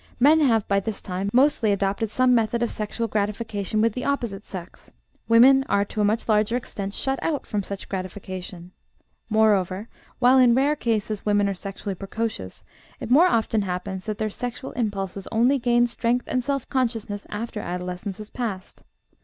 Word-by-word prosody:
Men 300 +5 +6
have, 230 -8 +3
by 200 0 +2
this 210 +1 -4
time, 190 +1 -3
mostly 255 -3 +3
adopted 200 +2 0
some 255 +3 +3
method 230 0 +1
of 235 - -1
sexual 220 +2 -3
gratification 210 0 -1
with 225 -1 +2
the 250 - -4
opposite 235 -8 -2
sex; 180 -4 -10 0.4
women 260 +4 +7
are 200 0 +2
to 210 - -3
a - - +3
much 215 +3 +1
larger 215 +2 +2
extent 200 -5 -5
shut 270 0 -1
out 295 -4 -1
from 210 - -2
such 200 0 -7
gratification; 185 -1 -6 0.6
moreover, 210 -2 +2 0.3
while 255 +1 +5
in 245 -2 +6
rare 280 +3 +3
cases 215 -5 -1
women 205 -1 +2
are 200 - 0
sexually 195 +1 -6
precocious, 195 - -5 0.3
it - - -6
more 320 +8 +7
often 225 -7 +1
happens 185 0 -4
that 215 -2 -3
their 215 0 -2
sexual 245 +3 -5
impulses 200 -4 -3
only 245 +5 +3
gain 240 0 +3
strength 240 +1 -1
and 255 -1 -1
self 275 -1 -2
consciousness 225 -5 -2
after 220 +1 -4
adolescence 180 +1 -5
has 215 0 -10
passed. 210 -7 -5
215 Hz, 170 wpm, -24 LUFS, 200-240 Hz, 0.6 s, women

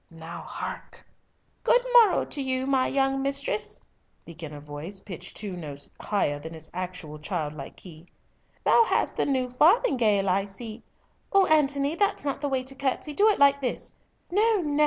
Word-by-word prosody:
now 165 +1 -9
hark!" - - -7 0.6
"Good - - +4
morrow 455 -6 +6
to 285 - -3
you, 260 -1 -1
my 265 -1 +2
young 270 0 +1
mistress," 280 - -1 0.5
began 165 -2 -8
a 150 - -8
voice 150 +6 -7
pitched 180 -2 -8
two 205 -4 -5
notes 145 -5 -7
higher 145 -8 0
than 160 +2 -8
its 160 0 -10
actual 175 -4 -6
childlike 150 -4 -4
key. 165 -2 -13 0.6
"Thou 470 - +6
hast - - 0
a - - +2
new 260 -2 +1
farthingale, 250 - +3
I 195 +2 +2
see! 220 +3 -8 0.5
O 395 -1 +5
Antony, 285 -2 +2
that's 405 -2 +1
not 280 -1 -2
the 290 - -1
way 265 -1 0
to 265 +1 -6
curtsey—do 285 +8 +1
it 425 - +4
like 280 0 +5
this. 250 - -2 0.4
No 435 +4 +3
no! 295 -2 -1
255 Hz, 165 wpm, -26 LUFS, 170-285 Hz, 0.6 s, morrow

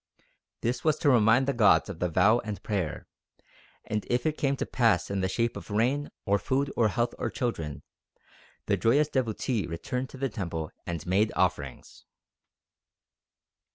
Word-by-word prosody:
This 120 +2 -1
was 155 -2 +3
to 145 - +3
remind 120 +2 +5
the 140 - +2
gods 110 -5 +4
of 80 - -7
the 90 - 0
vow 100 +8 +4
and 105 -3 -6
prayer, 95 -8 -2 0.8
and 105 -1 -2
if 125 +4 0
it 155 -1 +1
came 140 -2 0
to - - -2
pass 110 -8 +2
in 100 -1 -1
the 95 - 0
shape 115 +5 0
of - - -9
rain, 125 +8 +1 0.2
or 100 0 +2
food, 135 +8 -1
or 115 - +3
health, 120 +3 0
or - - -1
children, 80 - -3 0.8
the - - +1
joyous 140 +6 +3
devotee 120 -3 -1
returned 125 +10 -4
to - - -11
the 135 +1 0
temple 85 -7 -4 0.2
and 85 -2 -4
made 100 +5 +2
offerings." 75 -8 -2
110 Hz, 165 wpm, -28 LUFS, 95-130 Hz, 0.8 s, remind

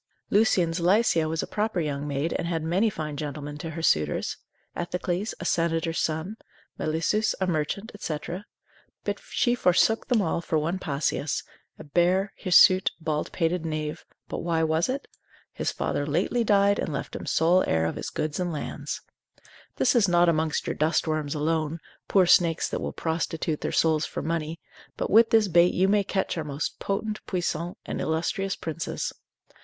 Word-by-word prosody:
Lucian's 180 -5 +3
Lycia 175 -3 +3
was 160 0 -1
a - - -5
proper 210 -3 -1
young 145 -2 -2
maid, 145 +3 -1
and - - -2
had 165 -2 -1
many 185 +7 +2
fine 155 -6 -5
gentlemen 145 0 -5
to 165 - -5
her 160 +1 -6
suitors; 75 - +1 0.4
Ethecles, 180 +3 -2
a 170 - -6
senator's 165 -1 0
son, 160 +7 -2 0.4
Melissus, 165 +8 +1
a 190 - +1
merchant, 180 +6 -2
&c. 155 -6 -2 0.9
but - - -3
she 240 - +2
forsook 225 0 +3
them 245 -3 +3
all 170 -3 0
for 160 - -1
one 165 +5 -1
Passius, 145 -1 -1 0.3
a - - -9
base, 180 +6 +2
hirsute, 185 0 +6
bald 155 -2 -2
pated 165 0 0
knave; 155 -2 -3 0.2
but - - -4
why 165 -1 0
was 160 +4 +1
it? 275 +2 -3 0.5
His - - -1
father 145 - -2
lately 180 +10 +1
died 200 -1 +3
and - - -2
left - - -4
him - - -6
sole 175 +3 +4
heir 80 0 +2
of 80 - -2
his - - -4
goods 155 +1 -3
and 180 -1 -1
lands. 150 - -5 0.7
This - - +3
is 230 -6 +4
not 175 0 +4
amongst 160 -2 +1
your - - -1
dust 155 +4 +1
worms 155 -2 -1
alone, 160 +1 -1 0.3
poor 190 -2 +4
snakes 170 -1 +4
that - - -3
will - - -3
prostitute 160 -1 -2
their - - -2
souls 160 -1 +2
for - - -5
money, 165 0 -2 0.4
but - - -2
with 225 +3 +6
this 220 -2 +4
bait 175 0 +4
you 185 +2 +3
may 205 +1 +3
catch 190 -3 -1
our - - -2
most 145 0 -4
potent, 210 +2 -3
puissant, 175 -1 -2
and - - -4
illustrious 190 +5 -1
princes. 160 -1 -4
165 Hz, 175 wpm, -26 LUFS, 155-190 Hz, 0.9 s, hirsute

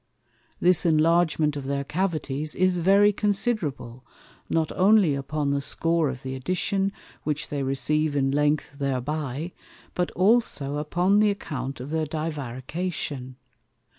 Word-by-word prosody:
This 180 0 +4
enlargement 160 -2 +3
of 140 -2 -5
their 140 0 -1
Cavities 155 -3 -2
is 185 -1 +2
very 200 +4 +5
considerable, 195 - -1 0.5
not 160 -1 0
only 195 -4 +4
upon 140 +1 -2
the 140 0 0
score 165 +1 +1
of 130 0 -7
the 130 0 -4
addition, 185 +8 -1 0.3
which 150 -1 -3
they 145 -1 -2
receive 145 +3 0
in 135 -1 +1
length 145 0 0
thereby, 140 +3 -2 0.4
but 180 -1 -1
also 185 -8 +2
upon 175 +7 +2
the 210 0 +4
account 140 -9 -4
of 130 +4 -7
their 160 -1 0
Divarication. 145 -2 -4
155 Hz, 130 wpm, -25 LUFS, 140-180 Hz, 0.5 s, very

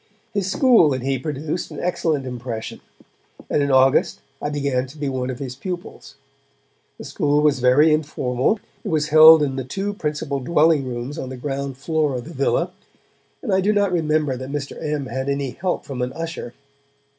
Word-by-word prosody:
His 200 -2 -1
school 225 - +5
and 130 - -5
he 135 -1 0
produced 150 +4 -4
an - - -8
excellent 160 -5 -1
impression, 120 -3 -6 0.7
and - - +2
in 140 - 0
August 130 0 +3 0.2
I 145 - -2
began 140 -3 -1
to 140 +4 -14
be 145 -1 -3
one 130 -1 -2
of 130 - -4
his 130 -2 -6
pupils. 175 +5 -7 0.8
The - - -9
school 150 -4 +1
was 150 -3 +3
very 135 +5 +5
informal; 145 - 0 0.2
it - - -6
was 155 -2 0
held 155 0 +9
in 135 -2 -2
the 130 - -2
two 195 +10 -3
principal 150 -5 -3
dwelling 155 +1 +3
rooms 125 +5 -5
on 130 - -5
the 130 - -7
ground 135 0 -4
floor 150 -1 0
of 125 - -4
the 165 - -9
villa, 160 +5 0 0.7
and 215 - -1
I 190 - +3
do 205 +3 +2
not 205 -2 +2
remember 155 -5 +1
that 130 +1 -7
Mr. 140 -1 -4
M. 150 -2 -2
had 130 +2 -3
any 140 -2 -1
help 180 +5 -3
from 135 -3 -5
an 125 +1 -2
usher. 165 -7 -6
145 Hz, 190 wpm, -22 LUFS, 130-160 Hz, 0.8 s, held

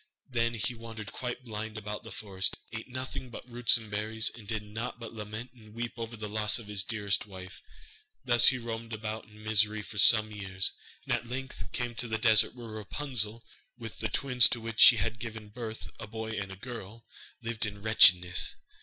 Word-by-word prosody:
Then 115 -1 0
he 110 +3 -1
wandered 115 -2 -8
quite 125 0 -5
blind 110 -1 -5
about 105 0 -5
the 115 - -10
forest, 95 -2 -3 0.2
ate 115 0 -5
nothing 130 0 -6
but 120 - -9
roots 120 0 +5
and 110 -2 -10
berries, 110 +1 0
and 110 -4 -12
did 110 -1 -2
naught 110 +3 -5
but 115 -1 -8
lament 110 +3 -7
and 110 -3 -16
weep 120 0 -3
over 115 0 -6
the 105 0 -5
loss 105 +1 +2
of 115 - -8
his 100 -2 +1
dearest 105 -1 -1
wife. 95 -1 -10 0.6
Thus 120 -2 +7
he 130 - +6
roamed 115 -1 -5
about 110 0 -4
in 105 0 -16
misery 110 0 +2
for 105 0 -6
some 110 +1 +7
years, 95 -2 -3 0.3
and - - 0
at 120 - -2
length 130 +1 -6
came 120 -1 -2
to 120 +1 -2
the 110 0 -1
desert 110 0 +4
where 120 -2 -9
Rapunzel, 110 0 -1 0.3
with 115 -3 -9
the 110 0 -1
twins 125 -3 +5
to 120 - -1
which 115 -1 -6
she 120 - +10
had 110 +3 -1
given 110 -2 -7
birth, 110 0 -7
a 105 - -7
boy 110 +1 -5
and 100 -3 -4
a - - -7
girl, 115 0 -9 0.4
lived 115 -2 -1
in 100 -1 -7
wretchedness. 90 -4 +5
110 Hz, 200 wpm, -30 LUFS, 105-115 Hz, 0.6 s, she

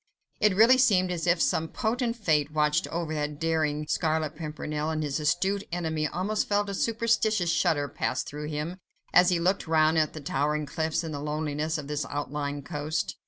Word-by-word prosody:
It 210 -3 +3
really 235 +5 +6
seemed 190 -8 +4
as 175 -1 -3
if 170 0 +3
some 160 0 +1
potent 230 +5 -1
Fate 155 -9 +1
watched 150 +2 +1
over 165 -1 -3
that 150 -1 -3
daring 155 -2 0
Scarlet 155 -2 0
Pimpernel, 150 -1 -4
and 155 -1 -1
his 145 0 -2
astute 190 +6 +1
enemy 160 -3 -1
almost 200 +7 -1
felt 205 0 +1
a - - -3
superstitious 220 -4 +1
shudder 155 -3 +1
pass 130 -2 -2
through 150 +1 -6
him, 155 +4 -4 0.4
as 180 - +6
he 175 -2 +2
looked 180 +1 0
round 160 0 +3
at 155 -1 +1
the 155 - -7
towering 150 +1 -1
cliffs, 160 +2 -1
and 160 -2 -5
the 145 - -4
loneliness 150 +1 -2
of 150 - -6
this 150 0 -2
outlying 145 0 -3
coast. 150 +3 -3
160 Hz, 185 wpm, -27 LUFS, 150-180 Hz, 0.4 s, really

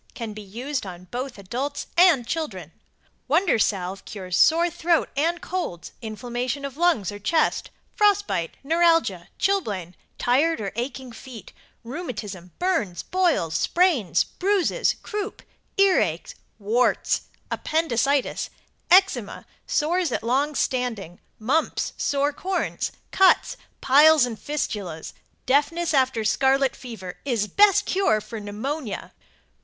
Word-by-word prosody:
Can 230 -3 -5
be 215 - -8
used 245 +8 -4
on 180 -2 -8
both 250 0 -4
adults 255 +9 -4
and 340 -8 +5
children. 210 - -4 0.6
Wonder 320 - +3
Salve 190 -2 -1
cures 185 -3 -5
sore 335 +2 +5
throat 335 0 +1
and 330 +5 +1
colds, 350 - -4
inflammation 245 +5 -4
of 275 -2 -6
lungs 320 - +2
or 205 - -8
chest, 310 +10 +1 0.3
frost 410 -1 +3
bite, 165 - -3
neuralgia, 330 - +2
chilblain, 205 - -1 0.2
tired 295 +7 +2
or 200 -3 -3
aching 250 +1 -5
feet, 235 -1 -11 0.3
rheumatism, 215 - -6
burns, 225 - -1
boils, 345 - +1
sprains, 255 - +2
bruises, 400 +5 0
croup, 420 -1 -5 0.3
earache, 390 -1 +2 0.2
warts, 225 +4 +1 0.3
appendicitis, 280 -3 0 0.4
eczema, 360 - +3 0.2
sores 335 +1 +1
at - - -2
long 275 +6 +1
standing, 225 -11 -2 0.2
mumps, 275 +9 0
sore 285 +1 0
corns, 370 +5 -2 0.2
cuts, 385 +5 +4 0.3
piles 295 +1 +6
and 230 -4 -6
fistulas, 200 - -4 0.3
deafness 300 +5 +1
after 260 -5 +2
scarlet 270 +4 +2
lever, 215 -8 -8
is 235 -6 0
best 405 - +4
cure 370 - +2
for 215 +1 -8
pneumonia. 220 +5 -5
265 Hz, 115 wpm, -24 LUFS, 215-330 Hz, 0.6 s, piles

